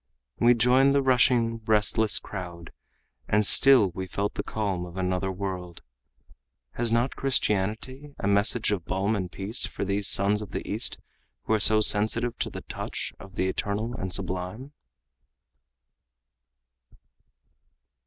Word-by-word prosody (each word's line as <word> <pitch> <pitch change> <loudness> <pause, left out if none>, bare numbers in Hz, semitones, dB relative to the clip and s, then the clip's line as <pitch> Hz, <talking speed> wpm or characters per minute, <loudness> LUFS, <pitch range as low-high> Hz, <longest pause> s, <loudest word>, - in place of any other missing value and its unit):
We 120 +1 +4
joined 130 +4 +3
the 140 - +3
rushing, 120 -3 +2
restless 110 0 +3
crowd 85 -4 -8 0.6
and 105 0 +2
still 125 -5 +7
we 95 +1 -6
felt 100 +3 -3
the - - -4
calm 100 -5 -3
of 90 +1 -10
another 95 0 -2
world. 90 -2 -6 0.9
Has 120 -1 -2
not 120 +3 0
Christianity 130 +3 -1
a - - -3
message 105 +3 +1
of 100 -5 -2
balm 100 +3 -1
and 90 -4 -4
peace 100 +6 -1
for - - -5
these 100 +1 -1
sons 100 +2 +1
of 105 - -10
the - - -5
East - - 0 0.5
who - - -1
are 110 - +2
so 110 +1 +6
sensitive 110 +3 +2
to - - -1
the - - -8
touch - - -6
of 95 0 -14
the 95 - -1
eternal 105 +5 -3
and 95 -5 -5
sublime? 95 +9 -4
105 Hz, 140 wpm, -25 LUFS, 95-115 Hz, 0.9 s, still